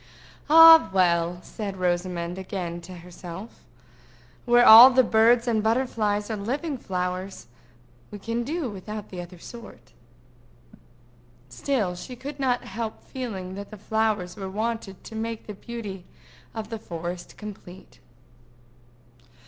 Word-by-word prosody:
"Ah, 325 +1 +9
well!" 175 -2 +2
said 200 -3 -6
Rosamond 175 0 -2
again 180 -3 -5
to 180 +2 -11
herself, 180 +4 -10 0.8
"where 240 0 +5
all 230 +3 +11
the 260 0 +4
birds 235 +2 +3
and 225 -2 +1
butterflies 220 -2 0
are - - -1
living 275 +9 -3
flowers, 185 -3 -4 0.6
we 205 - -8
can 230 +3 -3
do 310 +3 -3
without 210 0 -7
the 180 -2 -6
other 175 +1 -11
sort." 215 - -12 1.6
Still 185 - -2
she 250 +8 -9
could 275 +3 -8
not 250 -2 0
help 220 +2 -6
feeling 195 -8 -6
that 200 +2 -9
flowers 215 -4 -1
were 195 -2 -6
wanted 215 -1 -4
to - - -11
make 225 0 -5
the 210 - -7
beauty 205 -4 -8 0.5
of 215 -1 -5
the 225 - -4
forest 175 -1 -7
complete. 190 - -11
210 Hz, 125 wpm, -25 LUFS, 185-235 Hz, 1.6 s, all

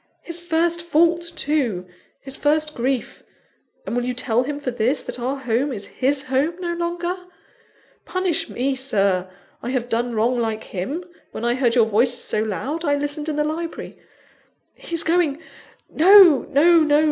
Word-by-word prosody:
His 335 0 -3
first 340 0 0
fault, 340 0 +2
too! 265 - -1 0.3
his 270 0 -6
first 300 +1 +1
grief! 255 0 -2 0.6
And - - -3
will 245 - 0
you 250 0 -2
tell 240 -1 +1
him 285 +3 -4
for 275 -3 -3
this, 245 +4 0
that - - -6
our 255 +3 -2
home 265 +1 -1
is 205 -5 -6
his 270 +1 +2
home 275 +5 0
no 345 -1 -2
longer? 345 +1 -2 0.9
Punish 370 -3 0
me, 265 +2 -1
Sir! 195 -8 0 0.3
I 240 - -5
have 250 -2 -2
done 235 0 -1
wrong 240 +3 +1
like 220 -2 -2
him; 265 - -4 0.3
when 230 - -6
I 240 - +2
heard 245 -2 +1
your 235 -3 +5
voices 235 +3 +1
so 215 - -1
loud, 240 - -3
I 290 -3 +2
listened 290 +2 -3
in 305 - -2
the 300 - +1
library. 325 +2 -5 0.8
He's 335 -1 -4
going! 320 -3 +1 0.5
No, 355 -3 +7
no, 335 +5 +5
no! 300 -2 +4
275 Hz, 170 wpm, -22 LUFS, 240-325 Hz, 0.9 s, No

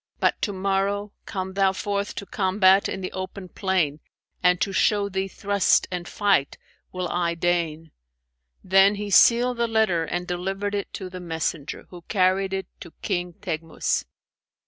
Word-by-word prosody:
But - - +1
to 205 - 0
morrow, 195 +1 -1 0.2
come 190 -2 -4
thou 195 -1 +2
forth 200 +1 -3
to 200 - -5
combat 190 0 +3
in 190 - -4
the 185 - -4
open 185 0 -6
plain, 175 -8 0 0.4
and 180 0 +4
to 195 - 0
show 200 +1 +2
thee 190 0 -2
thrust 200 0 +2
and 175 -1 -4
fight 200 -9 +1 0.3
will 185 -1 -3
I 170 -1 0
deign.' 165 -2 -1 0.7
Then 195 +2 +5
he 205 0 -5
sealed 240 +4 +5
the 235 0 +1
letter 220 -7 +2
and 175 +2 -3
delivered 195 +3 -3
it 200 -1 -3
to 190 - -5
the 185 - -7
messenger, 160 -3 -4
who 175 -1 -10
carried 190 -1 +2
it 190 0 -2
to 170 - -11
King 180 -3 -2
Teghmus." 165 -2 -2
190 Hz, 160 wpm, -24 LUFS, 175-200 Hz, 0.7 s, Then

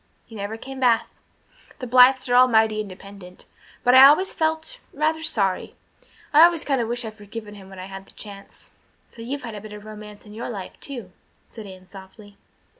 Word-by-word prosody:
He - - -17
never 210 +1 -5
came 265 +3 -9
back 240 -3 +3 0.7
the 255 - -7
Blythes 255 +2 +5
were 245 - -1
all 250 +1 +7
mighty 220 -2 +2
independent. 195 -2 -12 0.4
But 245 - +4
I 260 +1 +10
always 340 +7 +3
felt 320 +9 -2
rather 310 +2 0
sorry. 200 - -1 0.6
I've 310 +3 +9
always 340 -2 0
kind 270 -4 0
of 230 - -2
wished 240 +1 -2
I'd 220 - -7
forgiven 210 0 -10
him 195 -2 -13
when 190 - -12
I 185 - -7
had 195 0 -10
the - - -18
chance." 200 -2 -12 0.4
"So 230 - -13
you've 270 +4 -5
had 230 -2 -7
a 210 - -8
bit 215 0 -10
of 210 0 -11
romance 210 -1 -11
in 210 - -13
your 230 +3 -6
life, 200 -6 -7
too," 240 -10 -7 0.4
said 220 -3 -10
Anne 185 -1 -13
softly. 200 +2 -14
225 Hz, 200 wpm, -23 LUFS, 205-260 Hz, 0.7 s, I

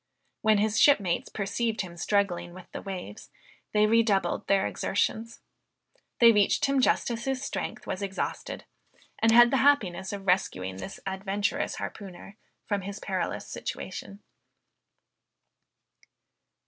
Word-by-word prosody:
When 215 -1 +4
his 215 +1 +1
shipmates 200 -12 +3
perceived 220 +3 -2
him 175 -3 -8
struggling 175 -2 -1
with 185 - -11
the - - -6
waves, 185 - -7 0.4
they 210 0 +4
redoubled 220 -3 +2
their 195 -1 +3
exertions. 225 +3 -2 0.8
They 235 -1 +8
reached 205 -3 +3
him 275 -1 +2
just 250 - +2
as 235 0 -4
his 270 0 -2
strength - - -4
was 185 - -4
exhausted, 195 -1 -4 0.5
and 225 - +4
had 240 +1 +7
the 270 - +3
happiness 210 -11 +2
of 200 -1 -6
rescuing 95 - 0
this 195 - -7
adventurous 195 +1 -2
harpooner 195 +1 -8 0.3
from 205 -2 -1
his 200 +2 -6
perilous 190 -3 -3
situation. 200 +1 -7
200 Hz, 125 wpm, -28 LUFS, 190-225 Hz, 0.8 s, They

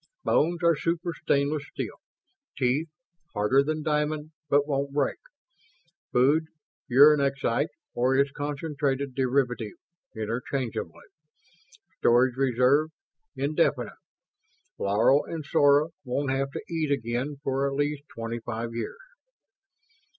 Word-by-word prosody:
Bones 170 +3 +1
are 170 -1 +5
super 170 +3 -2
stainless 145 0 0
steel. - - -5 0.6
Teeth, 135 +5 +1 0.5
harder 105 +7 +3
than 155 +2 -2
diamond, 150 0 -1 0.2
but 145 +1 +4
won't 140 -1 -1
break. 145 -1 0 0.9
Food, 145 +6 +3 0.4
uranexite 140 0 +4 0.3
or 125 +2 +2
its 140 +1 +3
concentrated 145 -2 -2
derivative, 125 -4 0 0.4
interchangeably. 115 -3 -4 0.9
Storage 120 +1 +4
reserve, 135 +3 +3 0.5
indefinite. 140 - 0 0.9
Laro 110 +8 +3
and 160 -3 -6
Sora 145 +3 +4
won't 130 +1 -1
have 135 +1 0
to - - -5
eat 160 -3 -1
again 125 +2 -1
for 135 0 0
at 135 - -4
least 145 0 -1
twenty 115 +1 -5
five 115 0 -5
years...." 115 - -4
140 Hz, 105 wpm, -27 LUFS, 125-150 Hz, 0.9 s, are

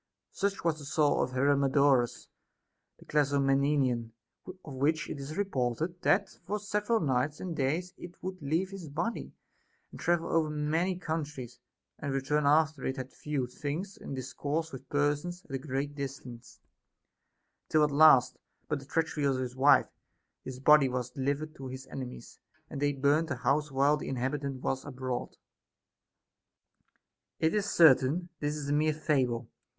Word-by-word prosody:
Such 200 0 -2
was 165 -2 0
the 145 - -9
soul 150 0 +2
of 130 - -2
Hermodorus 140 -2 +2 0.7
the - - -17
Clazomenian, 140 -4 +1 0.3
of 185 -6 -10
which 150 +4 0
it 140 - -6
is 140 +3 -6
reported 165 - -1
that 200 +1 +3 0.2
for 210 - -1
several 210 +2 0
nights 145 0 0
and 175 -3 -4
days 160 +7 -1
it 175 0 -10
would 185 -1 -5
leave 165 +7 -1
his 185 -6 -8
body, 175 +11 -3 0.7
travel 170 -1 +1
over 160 -2 +2
many 160 +5 0
countries, 150 -8 -5 0.4
and 140 - -3
re 135 - 0
turn 150 +2 +1
after 155 -2 +3
it 130 - -2
had 130 0 -6
viewed 135 -5 -3
things 165 +9 -4
and 140 - -7
discoursed 145 +5 -3
with 130 0 -9
persons 145 +5 -1
at - - -16
a 135 - -1
great 140 +1 -3
distance; 130 -4 -8 1.1
till 155 -1 +4
at 150 - +2
last, 130 -4 +6 0.3
by 150 - -1
the 135 - -10
treachery 160 0 -1
of 135 -2 +2
his 125 -1 -4
wife, 135 +2 +5 0.5
his 130 -1 -7
body 145 0 +6
was 125 -1 -3
delivered 145 +3 -2
to 135 -3 -8
his 130 +1 -7
enemies, 130 -2 -8 0.3
and 140 - -5
they 145 0 +3
burnt 145 +4 +2
the 130 - -2
house 140 +4 0
while 140 +3 +3
the - - -6
inhabitant 135 +1 -3
was 135 0 -1
abroad. 130 -3 -5 2.0
It 160 0 +2
is 210 -1 0
certain, 160 +2 +5
this 145 0 -1
is 145 -2 -5
a - - +1
mere 155 +1 +2
fable. 130 -6 0
145 Hz, 155 wpm, -30 LUFS, 130-160 Hz, 2.0 s, last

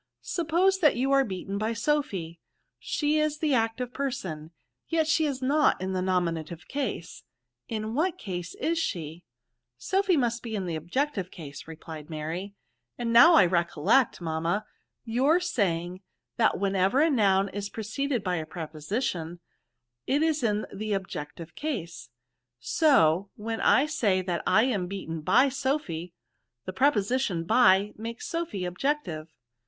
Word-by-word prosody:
Suppose 355 +3 +1
that 305 -5 +4
you 260 +3 0
are 275 0 +5
beaten 195 -2 -4
by 220 +2 -1
Sophy, 210 - -1 0.4
she 300 0 0
is 305 -1 0
the 300 -2 0
active 240 +1 0
person, 185 - -4 0.4
yet 325 -1 +1
she 320 -1 +3
is 265 -2 -4
not 295 +3 +3
in 190 +1 -3
the 185 - -1
nominative 170 -3 -2
case 270 - -4 0.2
— 125 0 -59
in 220 0 -3
what 345 +7 0
case 180 - -6
is 330 +1 -1
she?" 170 - -4 0.3
" - - -55 0.2
Sophy 385 -2 +1
must 240 -3 0
be 225 -2 -5
in 195 -3 -2
the 170 -2 -3
objective 195 - -2
case," 150 -5 -10
replied 160 -1 -9
Mary; 165 +6 -5 0.2
" 120 0 -54
and 235 -1 -2
now 330 +9 +8
I 195 - +7
recollect, 175 - +2
mam<f 160 -2 -3
ma, 175 +6 0 0.4
your 265 +9 +3
saying, 185 - -1 0.4
that 225 -2 +3
whenever 195 +4 +2
a 330 - +3
noun 195 -5 +3
is 200 +1 -5
preceded 235 +3 -2
by 180 -2 0
a 160 - -3
preposition, 165 - -4 0.7
it 285 +3 +2
is 315 -2 +1
in 215 -3 0
the 215 0 -2
ob 190 -1 -4
jective 155 +3 -7
case. 170 - -5 0.5
So, 190 - +3
when 225 +1 -4
I 270 - +5
say 215 -12 +1
that 175 -2 -2
I 220 - +5
am 210 -8 0
beaten 170 -4 -5
hy 270 - +4
Sophy, 265 - -2 0.5
the 185 - -5
preposition 230 -6 +1
by 205 0 +4
make^ 230 +1 -6
Sophy 330 - -3
objective." 180 - -2
205 Hz, 155 wpm, -27 LUFS, 175-275 Hz, 0.7 s, now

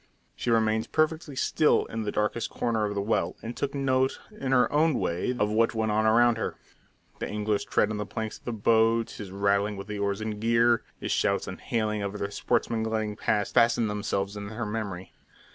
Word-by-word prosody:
She - - -3
remained 110 -1 +2
perfectly 155 -2 0
still 150 +2 +2
in 115 - -5
the 105 -1 -2
darkest 105 +3 -1
corner 110 -2 0
of 105 0 -3
the 100 - -1
well, 110 - 0
and 115 +2 -5
took 140 0 -3
note 130 -1 +1
in 135 -11 -4
her 125 -3 +5
own 155 0 +3
way 90 +5 -1
of 105 -2 +1
what 115 +2 +2
went 110 -1 0
on 110 +1 +2
around 120 +1 +4
her - - -2 0.6
the - - -3
angler's 105 0 -1
tread 105 - +1
on 105 - -3
the 105 - -3
planks 110 0 -5
of - - -34
the 120 - -2
boat, 115 +1 +2
his 105 -3 -8
rattling 100 +1 +1
with 100 - -6
the 105 0 -5
oars 100 0 -1
and 110 -1 -4
gear, 115 +1 +3 0.2
his - - -3
shouts - - +1
and - - -7
hailing 110 -2 -1
of 100 0 -3
other 100 -1 -3
sportsmen 110 +2 0
gliding 110 -1 -1
past, 105 -1 0
fastened 115 -2 +3
themselves 100 -1 -2
in 100 0 -6
her 110 +2 -4
memory. 105 -4 -5
110 Hz, 210 wpm, -27 LUFS, 105-115 Hz, 0.6 s, her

